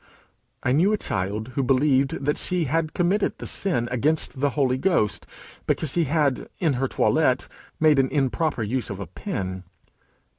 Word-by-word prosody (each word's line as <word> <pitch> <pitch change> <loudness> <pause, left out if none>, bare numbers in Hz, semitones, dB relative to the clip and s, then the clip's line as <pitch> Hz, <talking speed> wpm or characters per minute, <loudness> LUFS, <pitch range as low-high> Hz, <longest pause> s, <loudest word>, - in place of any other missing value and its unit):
I - - +1
knew 170 +10 +4
a - - +2
child 105 - -3
who 130 +2 -2
believed 135 +1 +2 0.2
she 180 -2 -1
had 155 +2 -1
committed 185 +4 +1
the - - -7
sin 140 -12 -1
against 145 +2 0
the 145 +1 +2
Holy 130 -2 +2
Ghost, 165 - +1 0.4
because 155 - 0
she 170 +2 +1
had, 145 -2 0
in 160 -5 +1
her 135 - +2
toilette, 130 -1 +2 0.3
made 155 -3 +5
an 130 -1 +2
improper 145 -1 0
use 120 +2 -2
of 100 -2 -5
a 100 - -4
pin. 95 - -5
135 Hz, 160 wpm, -24 LUFS, 125-160 Hz, 0.4 s, made